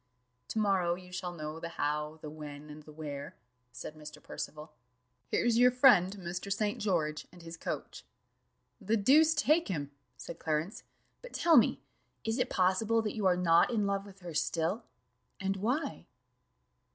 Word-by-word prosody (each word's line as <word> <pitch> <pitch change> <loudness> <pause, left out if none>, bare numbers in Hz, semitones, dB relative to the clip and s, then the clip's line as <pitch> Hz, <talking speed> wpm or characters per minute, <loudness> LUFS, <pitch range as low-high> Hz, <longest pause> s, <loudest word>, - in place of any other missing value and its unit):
"To - - -5
morrow 190 -5 +2
you 180 0 -13
shall 180 -1 -4
know 155 -2 -6
the 170 - -5
how, 150 +1 -1
the 150 - -5
when, 150 -1 -9
and 150 +1 -10
the 155 - -14
where," 145 -2 -7 0.4
said 125 +5 -7
Mr. 150 -1 -10
Percival: 155 0 -7 0.6
"here's 235 -1 +2
your 250 0 +7
friend, 225 -7 +5
Mr. 180 +2 -5
St. 205 +1 0
George, 160 -7 -1
and 175 -1 -14
his 165 0 -8
coach." - - -5 0.8
"The 215 +1 +1
deuce 305 +9 +5
take 310 +3 +3
him!" 145 -7 -3 0.3
said 165 - -8
Clarence: 160 +6 -2 0.4
"but - - -11
tell 335 -1 +4
me, - - +5 0.4
is 225 +3 -1
it 250 - +1
possible 205 +5 +2
that 210 - -3
you 210 -3 +1
are 180 -1 +3
not 170 -2 +4
in 220 -4 +1
love 200 0 -1
with 195 -1 -15
her 175 -2 -7
still? 170 +8 -1 0.5
and 195 0 -1
why?" 245 +11 -2
180 Hz, 165 wpm, -31 LUFS, 155-215 Hz, 0.8 s, your